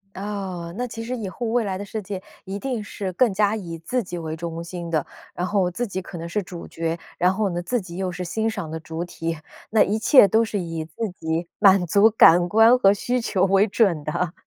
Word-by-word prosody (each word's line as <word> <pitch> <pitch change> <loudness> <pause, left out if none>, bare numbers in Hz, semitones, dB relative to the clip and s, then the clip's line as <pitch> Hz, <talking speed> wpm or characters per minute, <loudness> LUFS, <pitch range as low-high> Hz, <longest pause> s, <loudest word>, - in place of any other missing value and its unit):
哦， 190 -4 -5
那 250 +2 -2
其 225 -1 -7
实 250 +2 -3
以 215 -5 -4
后 235 +5 -5
未 230 +1 +1
来 195 -2 -2
的 200 - -5
世 220 +2 -5
界 190 -1 -6 0.2
一 195 +1 -5
定 250 -1 -3
是 195 -2 -5
更 230 +4 +3
加 205 +2 +2
以 170 -6 -6
自 240 +10 -2
己 180 -3 -7
为 160 -1 -4
中 165 0 -5
心 170 -1 -6
的， 155 -3 +1 0.3
然 180 - -2
后 185 -1 +1
自 240 +7 -3
己 190 -2 -4
可 180 0 -9
能 165 +1 -6
是 205 +5 -1
主 175 -1 -9
角， 165 0 -3 0.2
然 180 +1 +3
后 200 0 0
呢， 175 0 -3
自 245 +6 -1
己 175 -3 -9
又 190 -1 -2
是 180 0 -5
欣 220 +6 -1
赏 200 -8 -5
的 160 - -4
主 160 +1 -5
体。 165 -2 -4 0.3
那 215 -1 +5
一 210 +3 +1
切 240 0 +7
都 220 +4 +3
是 210 -2 -3
以 165 -3 -4
自 165 +8 -4
己 165 -1 -3
满 195 -3 +6
足 200 +6 +5
感 175 -5 +6
官 225 +5 +6
和 195 -5 +5
需 245 +5 -1
求 190 -5 +1
为 195 +1 +4
准 195 -7 +2
的。 160 +3 -2
190 Hz, 255 characters per minute, -23 LUFS, 170-215 Hz, 0.3 s, 切